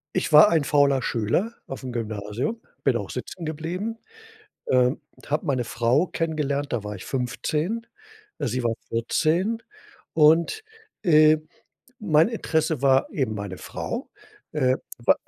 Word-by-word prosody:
Ich - - -1
war 155 +8 +9
ein 160 -3 +2
fauler 140 -2 +3
Schüler 120 - 0
auf'm 130 -1 -6
Gymnasium, 110 - -3 0.2
bin - - +3
auch - - -6
sitzengeblieben, 175 +7 -5 0.7
ähm, 125 0 +3 0.2
und - - -16
habe 150 +1 0
meine 130 -4 0
Frau 120 +9 +2
kennengelernt, 145 -4 -2
da 115 -4 -2
war 105 - -5
ich 95 - -9
15, 150 - -2 0.5
sie 125 -1 -1
war 115 -1 +1
14 170 - 0 0.5
und, 165 - +4 0.4
äh, 155 -3 +6 0.6
mein 160 -4 +4
Interesse 160 - -1
war 135 -1 +4
eben 130 -7 -1
meine 100 -3 -5
Frau, 240 +4 -5 0.4
äh, 130 -4 +2 0.2
wei 120 - +4
145 Hz, 130 wpm, -25 LUFS, 125-165 Hz, 0.7 s, war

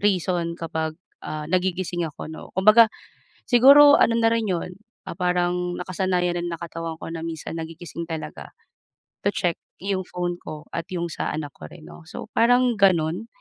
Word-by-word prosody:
reason 180 -4 0
kapag, 160 -1 -3 0.2
ah, 155 0 -5
nagigising 180 -2 0
ako 150 - -9
'no. 160 - -9
Kumbaga, 215 +4 +7 0.6
siguro 280 +4 +8
ano 230 0 +4
na 225 - +3
rin 225 -3 0
'yon, 180 0 -2 0.3
ah, - - -5
parang 180 -1 0
nakasanayan 180 -1 -1
rin 175 - -3
ng 170 - -4
katawan 165 -1 -5
ko - - -8
na 165 - -5
minsan 165 -1 -5
nagigising 165 +1 -7
talaga, 160 -1 -6 0.7
to 205 - +2
check 175 -4 0 0.2
'yong 195 0 -2
phone 175 0 -3
ko 150 -1 -8
at 165 - -2
'yong 175 -2 -2
sa - - -3
anak 150 -2 -5
ko - - -11
rin 160 -3 -13
'no. - - -12
So, - - -7
parang 245 +1 +4
gano'n? 185 0 +2
175 Hz, 170 wpm, -24 LUFS, 165-195 Hz, 0.7 s, siguro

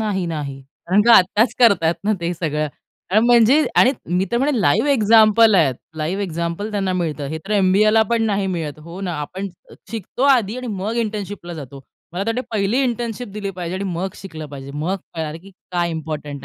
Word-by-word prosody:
नाही, 200 -4 -1
नाही. 145 -4 -5 0.3
कारण 200 +3 +4
का 235 - +5
आत्ताच 205 +6 +3
करतायत 195 -9 +4
ना, 215 - +2
ते 170 +1 -1
सगळं 155 -2 -2 0.6
म्हणजे 240 +5 +5
आणि 260 - +6 0.2
मी 185 +1 +2
तर - - +2
म्हणेन, 285 +2 +1
लाईव्ह 180 - +2
एक्झाम्पल 220 -2 +5
आहेत. 155 -9 +3 0.2
लाईव्ह 170 +6 -2
एक्झाम्पल 170 +3 -3
त्यांना 195 -3 -1
मिळतं. 155 -5 -2
हे 160 +1 -4
तर - - -8
एम-बी-ए 200 +1 +4
ला 220 0 +5
पण 230 -1 +2
नाही 200 -3 0
मिळत 160 -5 -4
हो 170 +4 -9
ना, 180 -3 -3
आपण 190 +6 -5 0.4
शिकतो 225 +2 -5
आधी 235 -4 +3
आणि 255 0 -6
मग 210 +1 -3
इंटर्नशिपला 205 -4 -6
जातो. 140 -3 -9 0.3
मला 185 +3 -2
तर - - -3
वाटतं 245 +3 -2
पहिली 215 +4 +1
इंटर्नशिप 240 -1 -3
दिली 205 -1 -4
पाहिजे 180 -1 -5
आणि 200 - -4
मग 185 +1 -3
शिकलं 160 -5 -8
पाहिजे. 140 -1 -9
मग 165 +6 -1 0.2
कळाले, 160 -1 -4
की 195 +3 -15 0.2
काय 175 -1 0
इम्पोर्टंट 150 -3 -5
190 Hz, 195 wpm, -20 LUFS, 165-220 Hz, 0.6 s, आणि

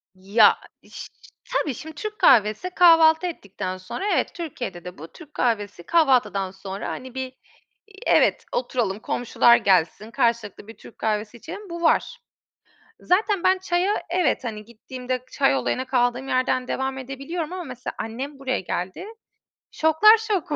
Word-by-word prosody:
Ya 205 +3 +4 0.3
iş - - -10 0.5
tabii 285 - 0
şimdi 315 +5 -10
Türk 425 +7 -6
kahvesi 215 - +4
kahvaltı 330 -1 +6
ettikten 195 - -6
sonra 185 - -5
evet - - -1
Türkiye'de 245 - -6
de 180 - -8
bu 160 - -9
Türk 300 - -16
kahvesi 205 -7 -1
kahvaltıdan 255 - +2
sonra, 195 +1 -7
hani, 255 0 -7
bir, 260 0 -3 0.6
eee, 405 -1 -16
evet - - +3
oturalım 240 -5 -1
komşular 240 +1 +3
gelsin 195 +3 +1
karşılıklı 230 -6 -1
bir 225 - -12
Türk - - -15
kahvesi 215 +1 -2
içelim 405 - -9
bu 340 0 -6
var. 470 +8 +1 0.8
Zaten 395 0 +1
ben 375 +1 +4
çaya 370 +2 0
evet 350 -5 +1
hani 215 -3 -6
gittiğimde 250 +2 -6
çay 275 -1 +2
olayına 260 -1 -1
kaldığım 250 0 0
yerden 255 -1 0
devam 265 0 -2
edebiliyorum 275 +6 -5
ama 370 -1 -5
mesela 255 -5 -7
annem 265 +6 -6
buraya 260 -1 -1
geldi. 185 - -4 0.7
Şoklar 320 +8 +5
şoku 410 -9 -2
255 Hz, 145 wpm, -23 LUFS, 215-330 Hz, 0.8 s, kahvaltı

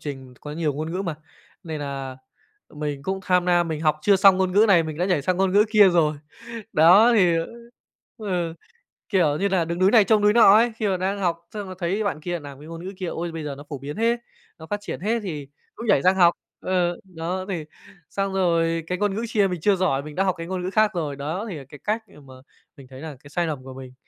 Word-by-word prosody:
trình 135 -3 -8
có 150 - -8
nhiều 155 -2 -1
ngôn 155 +3 -4
ngữ 190 +2 -2
mà, 170 -5 -3 0.5
nên 160 -3 -5
nà 135 -2 -5 0.6
mình 145 -2 -4
cũng 190 +3 -3
tham 180 -1 +2
nam, 175 -1 +2
mình 155 -1 -3
học 155 -1 +1
chưa 200 -1 +5
xong 195 -1 +6
ngôn 185 -1 0
ngữ 210 +3 +5
này 175 -4 +6
mình 155 0 -6
đã 180 - +1
nhảy 180 -7 +1
sang 180 +5 0
ngôn 190 0 +1
ngữ 205 +1 +5
kia 210 -3 +7
rồi. 160 -4 +2 0.6
Đó, 190 +10 +6
thì, 180 -5 +4
ơ 165 - -1 0.7
ừ, 180 -6 -2 0.6
kiểu 165 -8 +2
như 200 - +1
là, 185 -4 +1
đứng 170 +2 -4
núi 190 +2 +4
này 220 -4 +7
trông 215 0 +3
núi 210 0 +4
nọ 220 -4 +7
ấy, 235 +1 +4
khi 215 - -1
mà 190 - 0
đang 195 +2 -2
học 170 -2 -2
xong 205 -3 -6
là 185 - -7
thấy 190 +5 -1
bạn 175 -7 -2
kia 175 +1 -3
làm 140 -2 -11
cái 150 - -12
ngôn 165 +1 -8
ngữ 195 - -6
kia: 185 -2 -4
"Ôi, 170 0 -4
bây 165 -1 -6
giờ 145 -2 -5
nó 145 - -11
phổ 145 - -5
biến 140 +3 -7
thế, 230 +2 +1 0.4
nó 160 - -11
phát 205 +3 -4
triển - - -6
thế!", 225 +5 0
thì 150 -7 -5 0.3
cũng 235 - -7
nhảy 200 - +3
sang 185 +1 +4
học. 175 -2 +5 0.3
Ờ, 175 -2 0
đó 185 0 -5
thì 165 -5 -3 0.4
xong 195 -1 -2
rồi 165 -3 +1
cái 180 - -2
ngôn 205 0 0
ngữ 230 - -2
chia 210 -3 +2
mình 180 -3 -4
chưa 205 +3 +3
giỏi 160 -7 0
mình 150 0 -9
đã 195 - +1
học 185 -2 +1
cái 165 - -6
ngôn 185 0 -3
ngữ 185 - -2
khác 215 0 +3
rồi, 150 -5 -3
đó, 160 +10 -4
thì 175 - -5
là 140 - -9
cái 145 - -12
cách 220 +2 -1
để - - -20
mà 130 - -14 0.4
mình 135 -2 -13
thấy 130 +1 -12
là 155 -3 -7
cái 145 - -13
sai 170 +3 -1
lầm 145 -5 -4
của 130 0 -9
mình. 130 -1 -10
175 Hz, 265 wpm, -23 LUFS, 155-195 Hz, 0.7 s, kia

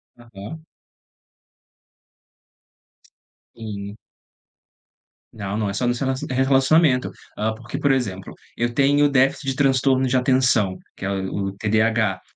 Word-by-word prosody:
Aham. 120 +6 -11 2.9
Sim. 105 -2 -7 1.4
Não, 100 -1 -4
não, 105 -2 -1
é - - -4
só 125 - -1
nos 120 0 0
rela 130 -1 0 0.2
relacionamento, 135 +1 +3 0.3
hã, 110 +1 -1
porque, 115 +5 -7
por 145 -1 +2
exemplo, 100 -8 -2 0.2
eu 120 0 -1
tenho 145 +2 +3
o - - +3
déficit 135 +1 +1
de 135 - -1
transtorno 135 -1 +2
de 130 - 0
atenção, 125 -6 +2 0.2
que - - -11
é - - -1
o 95 0 -3
o - - -3
TDAH, 110 -1 0
120 Hz, 125 wpm, -22 LUFS, 105-135 Hz, 2.9 s, relacionamento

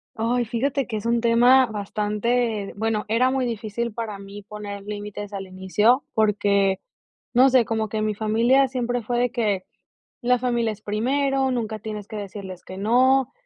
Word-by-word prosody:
Ay, 240 +2 +1
fíjate 260 +4 -1
que 220 -3 -3
es 210 - -7
un 235 0 +2
tema 245 +3 +5
bastante 210 +1 -1
bueno, 220 0 -1
era 235 +4 +3
muy 265 -1 0
difícil 230 0 -3
para 220 -3 -4
mí 200 +1 -10
poner 205 -1 -7
límites 205 0 -6
al 195 -1 -4
inicio. 205 +7 +2
Porque, 200 -2 +2 0.5
no 255 +2 +6
sé, 255 -2 +5
como 220 -1 -1
que 220 - -3
en 215 - 0
mi 215 - -1
familia 230 +6 +3
siempre 245 -1 -2
fue 240 +2 -1
de 245 -1 +1
que: 210 -7 0 0.6
"La 250 0 +2
familia 240 -2 0
es 210 - -15
primero, 265 +5 0
nunca 220 -3 -2
tienes 210 -2 -6
que 215 - -7
decirles 195 -2 -7
que 185 - -9
no, 255 +5 +3
225 Hz, 175 wpm, -23 LUFS, 205-245 Hz, 0.6 s, no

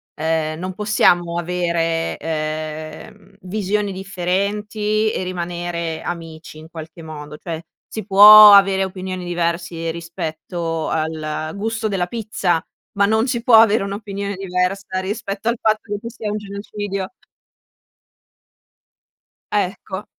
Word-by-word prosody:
ehm, 155 0 -1
non 185 +1 -4
possiamo 175 -4 +2
avere, 170 -1 -1
ehm, 155 +5 -5
visioni 205 +1 -1
differenti 205 +3 -1
e - - -2
rimanere 175 -2 -4
amici 165 -2 -7
in 155 +1 -12
qualche 160 0 -10
modo 150 -2 -9
cioè, 165 -1 -5 0.3
si 220 - -6
può 210 +1 +10
avere 195 -1 +6
opinioni 185 -1 -5
diversi 170 -1 -2
rispetto 165 0 -4
al 155 0 -3
gusto 220 +2 -2
della 195 -4 0
pizza, 200 -6 -1 0.4
ma 200 - +5
non 220 +4 +2
si 235 -2 -2
può 240 -1 +6
avere 220 -1 +4
un'opinione 200 0 -4
diversa 185 +1 -2
rispetto 200 +2 -4
al 235 +1 +1
fatto 215 0 +2
che 205 - -3
ci 230 - -6
sia 225 -2 -5
un 210 - -2
genocidio. 200 -1 -5 2.4
Ecco. 195 0 -2
185 Hz, 120 wpm, -20 LUFS, 165-205 Hz, 2.4 s, può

